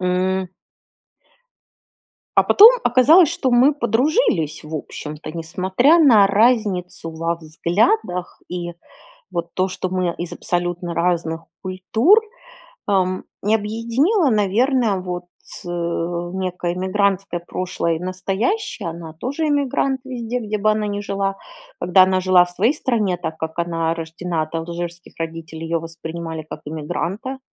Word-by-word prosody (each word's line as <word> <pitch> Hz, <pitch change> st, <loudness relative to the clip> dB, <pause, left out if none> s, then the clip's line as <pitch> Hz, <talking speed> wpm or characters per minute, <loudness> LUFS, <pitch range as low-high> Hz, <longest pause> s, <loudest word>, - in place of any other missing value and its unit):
М. 185 Hz, +1 st, 0 dB, 1.9 s
А -, -, +7 dB
потом 430 Hz, +3 st, +9 dB, 0.2 s
оказалось, 310 Hz, +7 st, +6 dB
что 335 Hz, -6 st, -1 dB
мы 255 Hz, +4 st, +5 dB
подружились, 235 Hz, -, +1 dB
в 155 Hz, +1 st, -7 dB
общем-то, 150 Hz, +1 st, -6 dB
несмотря 190 Hz, -, +2 dB
на 230 Hz, -10 st, +7 dB
разницу 195 Hz, -6 st, +1 dB
во 165 Hz, +1 st, -2 dB
взглядах 175 Hz, -, -1 dB
и 175 Hz, -1 st, -4 dB, 0.6 s
вот 170 Hz, 0 st, -4 dB
то, 185 Hz, +1 st, +1 dB
что 185 Hz, 0 st, -4 dB
мы 180 Hz, -2 st, -1 dB
из 175 Hz, -1 st, -5 dB
абсолютно 175 Hz, 0 st, -2 dB
разных 170 Hz, -1 st, 0 dB, 0.2 s
культур, 220 Hz, -, +3 dB, 0.7 s
эм, 185 Hz, -2 st, +1 dB, 0.2 s
и 215 Hz, -, +4 dB
объединила, 235 Hz, -, +1 dB
наверное, 220 Hz, +2 st, +2 dB
вот, 180 Hz, -1 st, -5 dB, 0.4 s
э, -, -, -6 dB
некое 175 Hz, +1 st, -3 dB
иммигрантское 190 Hz, -1 st, 0 dB
прошлое 170 Hz, -1 st, -2 dB
и -, -, -5 dB
настоящее. 190 Hz, -, -2 dB
Она 165 Hz, -1 st, -8 dB
тоже 280 Hz, -, -3 dB
иммигрант 275 Hz, -2 st, 0 dB
везде, 245 Hz, -2 st, -4 dB
где 215 Hz, -2 st, -3 dB
бы 215 Hz, +1 st, +3 dB
она 215 Hz, 0 st, 0 dB
ни 205 Hz, 0 st, -3 dB
жила. 195 Hz, -1 st, -2 dB, 0.4 s
Когда 180 Hz, +2 st, +5 dB
она 185 Hz, 0 st, +1 dB
жила 185 Hz, -1 st, +5 dB
в 175 Hz, -, -11 dB
своей 205 Hz, +8 st, +2 dB
стране, 215 Hz, -10 st, 0 dB
так 160 Hz, -2 st, -5 dB
как 160 Hz, +1 st, -5 dB
она 165 Hz, -1 st, 0 dB
рождена 165 Hz, 0 st, -3 dB
от 155 Hz, -, -8 dB
алжирских 170 Hz, +1 st, -5 dB
родителей, 165 Hz, 0 st, -6 dB
ее 165 Hz, +1 st, -1 dB
воспринимали 165 Hz, 0 st, -6 dB
как -, -, -7 dB
иммигранта 175 Hz, -, -4 dB
185 Hz, 130 wpm, -20 LUFS, 170-225 Hz, 1.9 s, потом